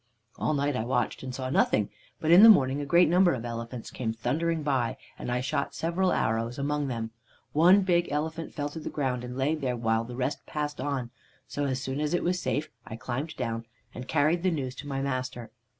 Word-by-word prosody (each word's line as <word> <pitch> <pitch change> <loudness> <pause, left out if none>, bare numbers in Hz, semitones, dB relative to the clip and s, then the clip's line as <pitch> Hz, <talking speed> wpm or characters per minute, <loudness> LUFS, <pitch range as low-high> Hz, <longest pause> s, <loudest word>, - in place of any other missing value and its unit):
"All 155 - +1
night 145 0 0
I 110 - -1
watched, 125 0 -1
and 130 - -6
saw 130 -1 -3
nothing, 105 -6 +2 0.3
but 160 - +1
in 175 +3 +9
the 225 - +11
morning 140 -8 +5
a 145 - -5
great 170 +5 +5
number 175 -1 +4
of 120 -1 -6
elephants 115 0 -6
came 115 -3 -2
thundering 155 +8 -1
by, 130 -5 0 0.2
and - - -4
I 125 0 0
shot 140 +2 -2
several 175 +3 +1
arrows 115 +2 0
among 145 +1 -1
them. 115 -3 -3 0.4
One 180 +6 +6
big 175 -2 +2
elephant 160 +2 -2
fell 145 0 -3
to 160 - -7
the - - -5
ground, 130 -4 -1
and 125 +1 -6
lay 135 +3 +1
there 130 -6 -2
while 115 -1 +1
the 120 +1 -8
rest 130 +3 -2
passed 150 -2 -3
on; 130 -4 -2 0.4
so, 145 - -2
as 130 -1 -2
soon 130 +2 -3
as 150 +3 +1
it - - 0
was 180 +1 0
safe, 155 +1 -2
I 110 - -8
climbed 130 +7 -4
down 115 -2 -3 0.3
and 125 +2 -7
carried 160 +4 +2
the 185 - +2
news 135 -7 -2
to 145 - -7
my 135 -1 -2
master. 130 -3 -3
140 Hz, 220 wpm, -28 LUFS, 125-155 Hz, 0.4 s, the